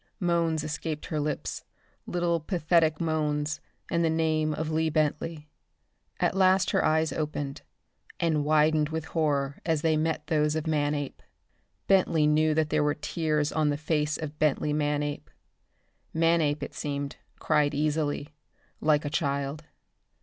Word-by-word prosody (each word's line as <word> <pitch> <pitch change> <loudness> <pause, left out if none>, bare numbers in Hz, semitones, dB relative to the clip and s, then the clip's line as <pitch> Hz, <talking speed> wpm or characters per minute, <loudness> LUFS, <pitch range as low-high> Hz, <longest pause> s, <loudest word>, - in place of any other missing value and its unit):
Moans 170 -4 +1
escaped 155 0 -4
her 155 - -2
lips, 150 0 -3 0.4
little 175 -1 0
pathetic 165 -2 +2
moans, 155 -1 -1 0.3
and 170 - +2
the 165 - +3
name 160 -1 +1
of 155 +1 -3
Lee 160 0 +1
Bentley. 155 +1 -1 0.7
At - - +1
last 190 0 +4
her - - +2
eyes 160 0 +2
opened, 145 -3 -3 0.6
and 160 -3 +1
widened 155 0 +3
with 160 -1 -3
horror 145 -4 0
when 160 -1 +1
they 160 -1 +3
met 155 -1 -1
those 150 -1 +1
of 155 - -2
Manape. 145 -2 -1 0.6
Bentley 180 -5 +3
knew 155 +1 +3
that 155 -1 +1
there 155 -1 +2
were 150 0 +1
tears 150 -1 -1
on 155 -2 +1
the 145 - 0
face 150 0 0
of 150 -1 -7
Bentley 150 0 +1
Manape. 145 -1 -1 0.9
Manape, 165 -2 +2
it - - -6
seemed, 140 -1 -4 0.2
cried 150 -2 +1
easily, 150 0 -1 0.5
like 150 -1 +2
a - - -1
child. 140 +1 -2
155 Hz, 140 wpm, -28 LUFS, 150-160 Hz, 0.9 s, last